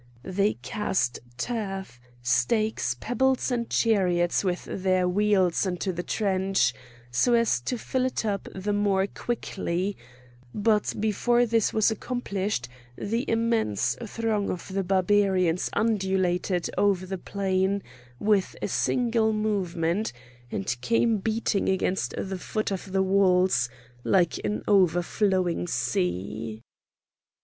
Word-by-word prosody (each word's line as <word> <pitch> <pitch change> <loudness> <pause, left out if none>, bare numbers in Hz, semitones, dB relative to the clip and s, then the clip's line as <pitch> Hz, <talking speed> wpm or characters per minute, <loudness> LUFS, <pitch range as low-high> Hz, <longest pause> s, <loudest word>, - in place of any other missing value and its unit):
They 195 +2 +1
cast 190 - -1 0.2
turf, 195 - -4 0.2
stakes, 125 - +1
pebbles 260 +3 +1
and 235 -2 -1
chariots 180 -6 +2
with 180 -2 -1
their 185 -1 +1
wheels 190 -2 +2
into 185 +1 -2
the 175 - -3
trench 190 - +1 0.4
so 240 - +3
as 230 - +3
to 245 - -2
fill 255 +3 -1
it 255 - -3
up 200 -2 -2
the 200 +2 -2
more 200 -2 +2
quickly; 200 -4 -3 0.6
but 210 0 +2
before 240 +3 +2
this 230 -2 +2
was 220 0 +3
accomplished 205 - -2 0.3
the 230 +6 -2
immense 225 - +1
throng 220 -2 -1
of 180 - -5
the 195 0 -1
Barbarians 190 -2 +2
undulated 190 -4 +1
over 200 -2 +2
the 190 0 -5
plain 195 +1 0 0.3
with 205 - +1
a - - -3
single 230 -3 +1
movement 195 - -1 0.4
and 95 +5 -2
came 230 - +2
beating 220 0 0
against 190 0 0
the 190 -1 -3
foot 215 +3 -2
of 190 0 -4
the 190 0 +2
walls 185 -9 +3 0.3
like 175 -4 +2
an 105 0 -2
overflowing 185 - +2
sea. 105 +8 -2
195 Hz, 120 wpm, -26 LUFS, 180-215 Hz, 0.6 s, so